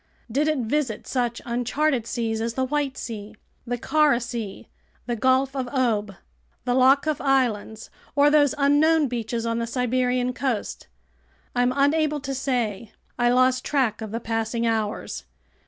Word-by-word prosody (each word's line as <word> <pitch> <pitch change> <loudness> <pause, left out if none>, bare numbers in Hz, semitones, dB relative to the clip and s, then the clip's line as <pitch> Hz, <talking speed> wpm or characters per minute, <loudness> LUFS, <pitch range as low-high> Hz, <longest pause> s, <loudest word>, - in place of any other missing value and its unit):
Did 290 +6 +1
it 310 -1 +1
visit 250 -1 -1
such 240 -2 -2
uncharted 245 +1 0
seas 225 -2 -2
as 230 0 -2
the 260 - +1
White 280 0 -1
Sea, 215 -2 -7 0.3
the 245 +1 -1
Kara 295 0 +3
Sea, 235 -5 -6 0.4
the 240 - -2
Gulf 260 +3 +2
of 260 -2 -2
Ob, 225 -6 0 0.5
the 245 - +1
Lyakhov 270 +3 +3
Islands, 240 -6 0 0.2
or 290 0 +5
those 290 -2 +4
unknown 295 +2 +4
beaches 235 -1 -3
on 230 0 -1
the 230 - -2
Siberian 250 +1 0
coast? 250 -5 -3 0.7
I'm 245 0 +3
unable 300 +1 +2
to 275 -1 -4
say. 235 -6 -2 0.3
I 240 0 +4
lost 255 +1 +3
track 255 -7 0
of 220 - -5
the 225 +3 -3
passing 225 0 -2
hours. 220 -2 -2
250 Hz, 150 wpm, -24 LUFS, 230-275 Hz, 0.7 s, or